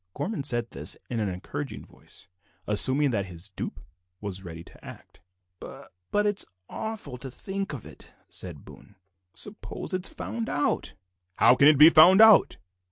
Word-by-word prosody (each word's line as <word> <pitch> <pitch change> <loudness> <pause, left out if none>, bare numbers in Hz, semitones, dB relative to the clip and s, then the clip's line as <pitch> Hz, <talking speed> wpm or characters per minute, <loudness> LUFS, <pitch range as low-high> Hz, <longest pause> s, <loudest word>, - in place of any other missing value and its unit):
Gorman 210 -5 -3
said 120 -4 +1
this - - -3
in 115 - -2
an 105 -2 -1
encouraging 90 0 -7
voice, - - -17 0.4
assuming 130 +7 +2
that 100 -4 -2
his 90 +2 -7
dupe 95 - -7 0.4
was 95 -2 -7
ready 85 -2 -9
to - - -19
act. - - -14 0.4
"B - - -9 0.4
but 205 0 +1
it's 205 -1 0 0.2
awful 220 - -6
to 135 +2 -8
think 195 +9 -5
of," 140 -7 -8 0.4
said 85 -7 -4
Boone; 100 - -16 0.4
"suppose 205 -1 -4
it's 185 0 -2
found 230 -1 -5
out?" 145 - -1 0.4
"How - - +5
can 140 +3 +5
it 150 -1 +6
be 155 +3 +9
found 175 +5 +7
out?" 220 -2 +6
135 Hz, 160 wpm, -26 LUFS, -, 0.4 s, be